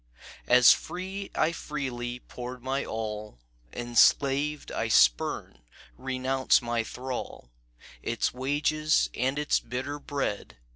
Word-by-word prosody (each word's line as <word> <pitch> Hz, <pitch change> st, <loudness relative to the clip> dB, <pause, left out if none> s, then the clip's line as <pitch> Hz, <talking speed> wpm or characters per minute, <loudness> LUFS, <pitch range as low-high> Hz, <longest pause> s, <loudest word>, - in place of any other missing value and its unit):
"As 125 Hz, -1 st, +8 dB
free 190 Hz, +2 st, -3 dB
I 155 Hz, -, +2 dB
freely 125 Hz, -6 st, -5 dB
poured 125 Hz, 0 st, -8 dB
my 135 Hz, +1 st, -1 dB
all, 105 Hz, -, -5 dB, 0.3 s
Enslaved 140 Hz, +5 st, +2 dB
I 110 Hz, -, -1 dB
spurn, 65 Hz, -, +2 dB, 0.4 s
renounce 130 Hz, 0 st, +1 dB
my 120 Hz, -1 st, -1 dB
thrall, 125 Hz, -, -6 dB, 0.5 s
Its 115 Hz, -, -1 dB
wages 145 Hz, +4 st, +1 dB
and 130 Hz, +3 st, -1 dB
its 150 Hz, 0 st, +2 dB
bitter 130 Hz, +5 st, -5 dB
bread." 135 Hz, -, -4 dB
130 Hz, 105 wpm, -28 LUFS, 120-145 Hz, 0.5 s, As